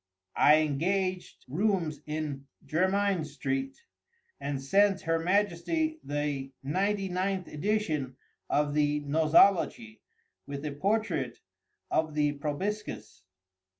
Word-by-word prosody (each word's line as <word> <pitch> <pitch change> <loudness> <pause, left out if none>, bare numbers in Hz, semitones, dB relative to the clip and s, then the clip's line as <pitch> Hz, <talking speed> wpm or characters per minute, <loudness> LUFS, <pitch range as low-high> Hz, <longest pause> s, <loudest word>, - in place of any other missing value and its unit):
I 150 - +7
engaged 185 +5 -1
rooms 170 0 0
in 150 -3 -4 0.2
Jermyn 190 +2 +1
street, 265 - -3 0.6
and 140 -1 -3
sent 195 +8 +3
her 165 0 0
Majesty 205 - 0
the 145 -2 -2
ninety 195 +7 0
ninth 185 0 -1
edition 155 -7 -1 0.3
of 145 0 +1
the 150 0 +2
"Nosology," 155 - +3 0.5
with 140 +1 -5
a 150 - -2
portrait 165 - -1 0.5
of 155 -1 0
the 150 -1 +2
proboscis. 155 - -4
160 Hz, 100 wpm, -29 LUFS, 145-195 Hz, 0.6 s, I